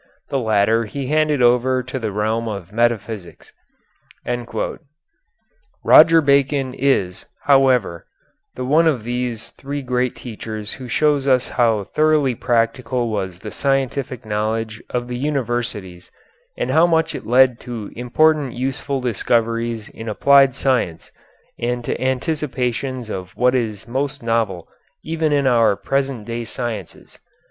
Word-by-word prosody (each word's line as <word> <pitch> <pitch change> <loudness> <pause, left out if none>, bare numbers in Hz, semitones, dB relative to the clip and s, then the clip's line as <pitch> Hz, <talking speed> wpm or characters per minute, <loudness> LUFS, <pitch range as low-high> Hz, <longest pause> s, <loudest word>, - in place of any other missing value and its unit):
The 135 - 0
latter 110 0 +2
he 135 +5 -5
handed 150 -1 +1
over 125 +1 +3
to 130 +2 -5
the 110 -3 -3
realm 110 +3 -1
of 100 -4 -6
metaphysics. 115 -5 -2 2.3
Roger 165 +1 +7
Bacon 140 -2 +2
is, 100 -10 0 0.2
however, 130 - +3 0.5
the 125 - -4
one 155 +5 +4
of 135 -8 +1
these 120 -1 -3
three 140 +1 -6
great 125 -1 -1
teachers 110 -2 -7
who 130 -2 -9
shows 145 +2 +1
us 130 -2 +2
how 115 -4 +2
thoroughly 150 +3 +2
practical 120 +1 0
was 95 -4 -3
the 105 +3 -8
scientific 135 -3 -1
knowledge 110 +1 -2
of 120 0 -2
the 125 0 -4
universities 120 -10 -3 0.5
and - - -1
how 165 +2 +5
much 160 -1 +1
it - - -7
led 125 0 +4
to 115 -4 -7
important 140 +2 +2
useful 135 +2 -3
discoveries 115 -1 -1
in 115 0 -8
applied 135 +4 +5
science 125 -12 -1 0.5
and 120 0 -2
to - - -3
anticipations 130 -3 -2
of 90 -1 -7
what 125 +1 +3
is 115 -4 -2
most 135 +2 -3
novel 115 -7 -1 0.4
even 160 -1 -1
in 140 -1 +2
our 115 -5 +4
present 135 -2 -2
day 115 +1 -4
sciences. 115 -5 -7
125 Hz, 130 wpm, -20 LUFS, 110-135 Hz, 2.3 s, Roger